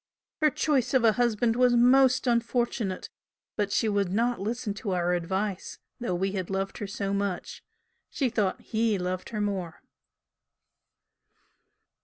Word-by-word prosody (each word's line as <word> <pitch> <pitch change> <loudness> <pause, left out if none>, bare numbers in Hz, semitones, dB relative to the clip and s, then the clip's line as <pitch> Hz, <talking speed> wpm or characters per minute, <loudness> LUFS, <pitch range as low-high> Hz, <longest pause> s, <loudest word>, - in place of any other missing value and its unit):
Her 305 - +5
choice 280 -3 0
of 255 - +4
a 225 - +6
husband 230 0 +1
was 250 0 +4
most 255 +2 +5
unfortunate 235 -4 0 0.5
but 205 -2 -1
she 220 - +1
would 200 -3 0
not 235 +4 +1
listen 220 0 -2
to 205 -1 -4
our 175 0 +1
advice, 190 +3 -2 0.2
though 235 -7 -2
we 190 +2 -1
had 190 -3 -4
loved 195 0 -3
her 205 - -4
so 195 0 -3
much 200 -2 -3 0.5
she 270 - 0
thought 210 -5 0
'he' 220 -2 0
loved 180 0 -3
her 215 -2 -3
more." 190 -5 -3
210 Hz, 145 wpm, -27 LUFS, 195-240 Hz, 0.5 s, a